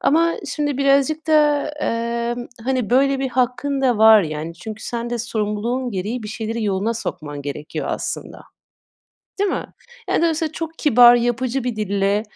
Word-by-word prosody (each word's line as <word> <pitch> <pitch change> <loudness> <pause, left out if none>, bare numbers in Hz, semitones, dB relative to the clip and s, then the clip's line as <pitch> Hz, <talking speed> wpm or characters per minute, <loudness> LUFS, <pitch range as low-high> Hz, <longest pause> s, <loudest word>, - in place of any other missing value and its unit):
Ama, 335 +3 +3
şimdi 290 -2 -2
birazcık 280 +3 +2
da, 300 -2 +3
emm, 235 -4 -2 0.2
hani, 255 -4 -1
böyle 270 +2 +3
bir 265 0 -1
hakkın 255 +3 0
da 250 -5 +2
var, 220 -1 +8
yani, 155 0 -5
çünkü 215 +5 -8
sen 235 -1 -4
de 240 - -2
sorumluluğun 230 +3 -2
gereği 210 +5 -3
bir 210 - -6
şeyleri 225 +1 -3
yoluna 205 +3 0
sokman 145 -9 -5
gerekiyor, 145 +1 -5
aslında. - - -5 1.0
Değil 400 0 +1
mi? - - -3 0.4
Yani, - - +2
dolayısıyla 320 -1 0
çok 325 0 -6
kibar, 245 -4 +7
yapıcı 245 +2 -1
bir 245 -3 -2
dille, 200 0 0
240 Hz, 155 wpm, -21 LUFS, 215-275 Hz, 1.0 s, var